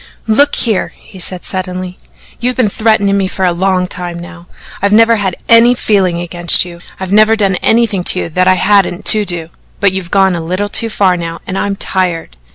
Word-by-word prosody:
"Look 280 +7 +2
here," 220 -5 -1
he 190 - -15
said 180 0 -1
suddenly, 185 -1 -5 0.4
"you've 250 +1 -1
been 245 -5 +1
threatening 215 -2 +1
me 195 -1 0
for 190 0 -2
a 180 - +2
long 185 +1 0
time 175 -1 -6
now. 175 0 -11 0.3
I've 200 +1 +1
never 225 +2 +4
had 190 -4 -2
any 230 +2 +5
feeling 190 -7 0
against 175 0 0
you. 170 -1 -11 0.2
I've 190 0 -4
never 215 +1 +5
done 195 -4 0
anything 225 -5 +1
to 185 - +3
you - - -5
that 180 +3 0
I 185 - +5
hadn't 195 -1 +1
to 215 -1 -1
do. 170 -3 -1 0.3
But 200 -2 +2
you've 190 -2 -5
gone 195 -1 +2
a 170 - -4
little 185 +5 -3
too 225 +2 +1
far 195 -4 +1
now 165 -1 -6
and 185 - -5
I'm 200 +1 -2
tired. 180 - -2
190 Hz, 205 wpm, -12 LUFS, 180-210 Hz, 0.4 s, any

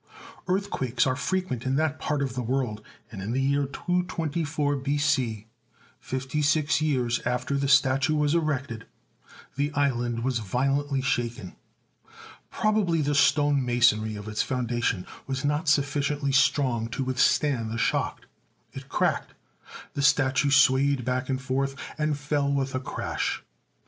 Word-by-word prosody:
Earthquakes 180 - 0
are 130 -1 +1
frequent 185 -7 -2
in 130 +1 0
that 155 0 0
part 150 -2 -1
of 130 -3 -3
the 125 - -3
world, 120 -3 -2 0.3
and 100 -5 -7
in 105 +5 -3
the 130 - 0
year 140 +1 +1
224 160 -3 -1
B.C., 135 -6 0 0.5
fifty 130 +3 -3
six 150 +1 +2
years 125 -6 +1
after 125 +3 -1
the 140 0 0
statue 140 +2 +3
was 150 0 +2
erected, 140 -8 -2 0.7
the 145 +1 0
island 120 -4 0
was 130 -2 0
vio 130 +7 0
lently 140 -2 -2
shaken. 120 -7 -2 0.9
Probably 200 -7 +1
the 145 +1 0
stone 145 -1 +3
masonry 120 -3 +2
of 105 0 -8
its 105 0 -1
foundation 120 -7 -1 0.2
was 135 +1 -3
not 150 +2 0
sufficiently 145 -1 +1
strong 135 -4 +2
to 135 - -3
withstand 130 -1 +1
the 115 - -4
shock. - - -1 0.5
It - - -9
cracked; - - -1 0.6
the 140 - -2
statue 140 0 +3
swayed 140 -1 +4
back 130 +1 -1
and 130 -1 0
forth, 135 +1 -2 0.2
and 150 -1 0
fell 145 0 0
with 135 -1 -1
a 130 - -1
crash. 130 - -3
135 Hz, 145 wpm, -26 LUFS, 125-145 Hz, 0.9 s, swayed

